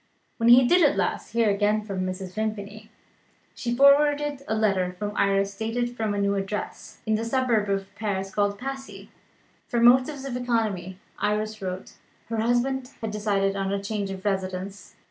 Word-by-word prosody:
When 230 0 +3
he 245 +1 +8
did 355 +5 +5
at 290 -3 +4
last - - -2
hear 230 -2 +3
again 210 +1 +1
from 190 -3 -3
Mrs. 185 0 -5
Vimpany, 215 0 -4 0.6
she 240 -1 -3
forwarded 290 +1 +4
a 220 - 0
letter 195 -4 +1
from 205 +3 -5
Iris 195 0 +1
dated 240 +3 -2
from 220 -3 -1
a - - -2
new 200 0 +1
address, 200 +1 -5
in 220 - +1
the 215 +1 0
suburb 230 -3 +1
of 195 0 -2
Paris 195 -3 -3
called 205 -1 +1
Passy. 270 +2 -7 0.6
From 235 -1 +2
motives 260 +3 +4
of 265 -3 -4
economy 220 -7 -1 0.2
(Iris 215 +1 -1
wrote) 185 0 -5 0.4
her 230 - -2
husband 245 +3 0
had 220 -1 -3
decided 200 -2 0
on 195 0 -1
a 200 - 0
change 200 0 -3
of 190 +1 -7
residence. 190 0 -3
215 Hz, 170 wpm, -25 LUFS, 195-240 Hz, 0.6 s, he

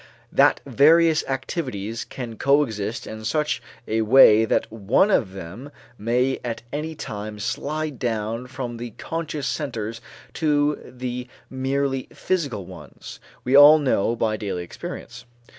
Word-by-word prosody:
That - - +4
various 160 +2 +5
activities 125 - -3
can 120 -3 -7
coexist 125 -5 +1
in 110 0 -8
such 150 +7 0 0.3
a 110 +1 +1
way 110 -1 +7
that - - 0
one 115 - +2
of 95 - +1
them 95 +9 -8 0.3
may 125 +4 0
at 115 -2 -4
any 155 +2 -3
time 105 -5 -6
slide 150 +6 -3
down 115 +1 -2
from 125 -2 -6
the 120 -1 -7
conscious 160 -3 -4
centers 115 -7 -3 0.3
to 150 -2 +1
the 125 0 -6 0.2
merely 135 0 -1
physical 140 - -2
ones, - - -11 0.2
we 130 +2 +2
all 145 +2 +10
know 125 -6 +1
by 110 -2 0
daily 95 -5 -4
experience. 85 - -8
125 Hz, 130 wpm, -23 LUFS, 110-145 Hz, 0.3 s, all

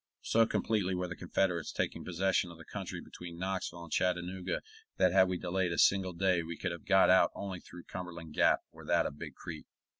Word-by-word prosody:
So 115 0 +4
completely 100 -6 0
were 90 0 -2
the 90 - -6
Confederates 90 -2 0
taking - - -2
possession 90 0 +1
of 85 - -11
the 85 - -12
country - - -5
between 85 -1 -9
Knoxville 95 -2 -3
and 85 - -11
Chattanooga 90 0 0 0.4
that 90 - +4
had 95 0 +6
we 90 -1 -1
delayed 90 0 -1
a 85 - -2
single 95 -2 +4
day 90 0 +2
we 80 0 -6
could - - -2
have 85 - -7
got 95 -1 +6
out 95 - +6
only 95 -2 -5
through 90 0 -12
Cumberland 85 -3 -7
Gap - - +4
or - - -13
that - - +2
of 75 - -5
Big - - -7
Creek. - - -8
90 Hz, 210 wpm, -32 LUFS, 85-95 Hz, 0.4 s, had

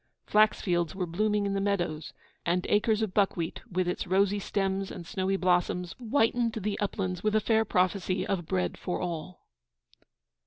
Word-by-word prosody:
Flax 215 +1 +4
fields 175 -2 0
were 185 -2 -1
blooming 210 +4 0
in 200 - -1
the 195 - 0
meadows, 175 -6 -1 0.3
and 180 +1 0
acres 215 +1 +2
of 205 -4 -2
buckwheat, 185 -5 0
with 185 0 0
its 180 - -2
rosy 195 +2 +2
stems 195 -1 -1
and 175 - -8
snowy 195 0 -1
blossoms, 180 -1 +1
whitened 235 -1 +1
the 210 -1 -3
uplands 185 -3 -2
with 215 0 +1
a - - +5
fair 220 +1 +2
prophecy 185 -1 +1
of 175 -5 -2
bread 90 -1 -1
for 180 - -3
all. 175 0 -5
190 Hz, 165 wpm, -29 LUFS, 180-210 Hz, 0.3 s, a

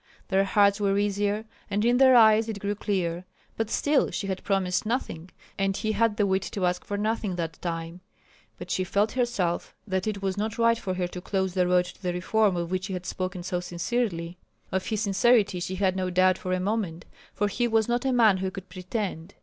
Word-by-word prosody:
Their 195 0 +3
hearts 200 +1 +3
were 200 -1 +2
easier, 205 +1 0 0.2
and 205 +2 0
in 240 +1 +4
their 260 -1 +6
eyes 220 -1 +6
it 215 - -3
grew 200 +1 -2
clear. 185 -4 -2 0.3
But 225 -1 -2
still 290 +4 +2
she 205 - -4
had 190 -1 -3
promised 190 -2 0
nothing, 215 -7 -3 0.3
and 195 0 +1
he 215 - -1
had 215 0 +1
the 205 - +3
wit 190 0 +1
to 195 -3 0
ask 180 0 0
for 205 - -4
nothing 215 -2 -1
that 165 -2 -4
time. 165 0 -4 0.6
But - - -8
she 185 - +1
felt 205 +4 +1
herself 235 -9 -1
that 190 -1 -2
it 200 -2 -3
was 190 0 -1
not 215 0 -2
right 230 0 +3
for 185 -1 -3
her 180 -1 -1
to 180 - -7
close 190 -1 -1
the 180 -1 +2
road 180 0 +3
to - - -12
the 180 -2 -1
reform 195 +2 +1
of 170 0 -3
which 185 0 -1
he 195 - -5
had 180 -1 -5
spoken 185 -1 -4
so 180 0 -2
sincerely. 175 -1 -2 0.3
Of 190 0 -1
his 215 -2 -1
sincerity 205 -1 +3
she 185 +2 -3
had 190 -1 +1
no 185 -1 -1
doubt 185 +1 +3
for 185 - -4
a 185 - +1
moment, 185 -4 -2 0.3
for 205 - 0
he 240 +4 0
was 225 -2 +2
not 240 0 0
a 265 - +1
man 225 -6 +5
who 190 0 -2
could 190 0 -9
pretend. 185 -1 -5
195 Hz, 220 wpm, -26 LUFS, 180-215 Hz, 0.6 s, their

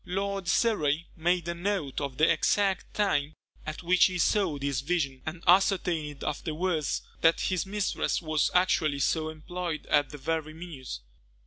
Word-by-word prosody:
Lord 195 0 -3
Surrey 170 -7 +1
made 175 +1 0
a 170 - -1
note 170 -6 -2
of 140 -3 -4
the 155 - +5
exact 195 -2 +1
time 155 -8 +1 0.3
at 155 +3 -5
which 180 +1 +5
he 185 -1 0
saw 180 -3 +2
this 140 -2 -1
vision, 140 -4 -1
and 165 +1 -5
ascertained 175 -6 +2
afterwards 160 +1 -1 0.2
that 165 0 +4
his 185 0 -1
mistress 205 0 -1
was 155 -3 +1
actually 160 -5 +3
so 155 +3 0
employed 165 +1 -5
at 145 -2 +3
the 145 - -8
very 155 +2 -3
minute. 145 - -7
165 Hz, 150 wpm, -28 LUFS, 150-180 Hz, 0.3 s, the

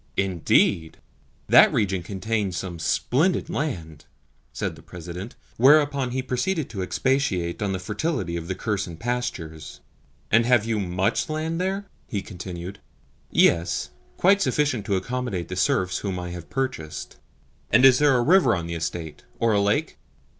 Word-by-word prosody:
"Indeed? 85 -3 +2 0.5
That - - +7
region 95 -3 0
contains 100 0 -2
some 85 -1 -5
splendid 145 - +1
land," 80 - -4 0.5
said - - -3
the - - -14
President; 90 +5 -8 0.2
whereupon 140 0 +4
he 130 +1 -2
proceeded 145 +5 -1
to 100 -4 -4
expatiate 95 -5 0
on 100 -2 0
the 95 - -1
fertility 105 - -2
of 85 -1 -5
the 95 - -2
Kherson 100 -6 -3
pastures. 85 -10 -4 0.5
"And 115 +2 +5
have 120 -3 +4
you 115 -2 0
MUCH 95 - 0
land 160 +2 -2
there?" 195 +2 -2 0.2
he 100 -6 -3
continued. 90 0 -7 0.5
"Yes; 85 +1 +2 0.3
quite 200 +2 +4
sufficient 130 - 0
to 100 - +1
accommodate 100 -4 -3
the 90 - -4
serfs 90 0 +1
whom 95 -3 -3
I 90 -1 -5
have 85 -1 -8
purchased." 130 - -4 0.5
"And 120 +5 +6
is 130 -2 +7
there 145 -3 +4
a 120 - +2
river 160 - +5
on 85 -2 -4
the 85 - -5
estate 80 -1 -4 0.2
or 115 -1 +2
a 100 - +3
lake?" 105 +10 0
100 Hz, 155 wpm, -24 LUFS, 90-130 Hz, 0.5 s, That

